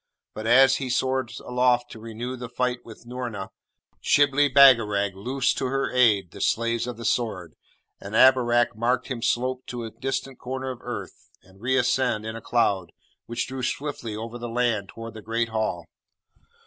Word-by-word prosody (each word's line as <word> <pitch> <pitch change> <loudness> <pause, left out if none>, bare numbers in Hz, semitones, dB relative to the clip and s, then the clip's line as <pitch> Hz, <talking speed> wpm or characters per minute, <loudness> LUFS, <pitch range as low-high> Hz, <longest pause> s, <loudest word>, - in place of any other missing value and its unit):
But, 110 +1 -5
as 130 +2 +6
he 130 -2 -4
soared 130 -1 0
aloft 125 -1 +1
to 115 - -10
renew 115 +3 -6
the 125 -1 -7
fight 125 0 -1
with 115 0 -13
Noorna, 120 -5 -5 0.5
Shibli 145 0 +3
Bagarag 115 -7 +5
loosed 130 +7 -1
to 130 - -1
her 135 +1 -1
aid 105 -8 +3
the - - -10
Slaves 115 +1 0
of 120 -2 -5
the 115 - -7
Sword, 100 -8 -1 0.5
and 100 +2 -7
Abarak 120 -2 +4
marked 125 +4 0
him 125 -3 -4
slope 130 +2 0
to 120 -1 -5
a 110 - -6
distant 130 +3 -4
corner 130 +1 -4
of 125 - -9
earth, - - -8
and 95 +1 -21
reascend 125 -2 +1
in 110 0 -5
a 115 - -7
cloud, 100 -7 0 0.3
which 120 - -2
drew 130 0 -5
swiftly 130 -4 -3
over 115 +2 -6
the 120 0 -5
land 115 -4 0
toward 115 0 -9
the 110 - -9
Great 115 +2 -1
Hall. 110 -1 -2
120 Hz, 175 wpm, -25 LUFS, 110-130 Hz, 0.5 s, as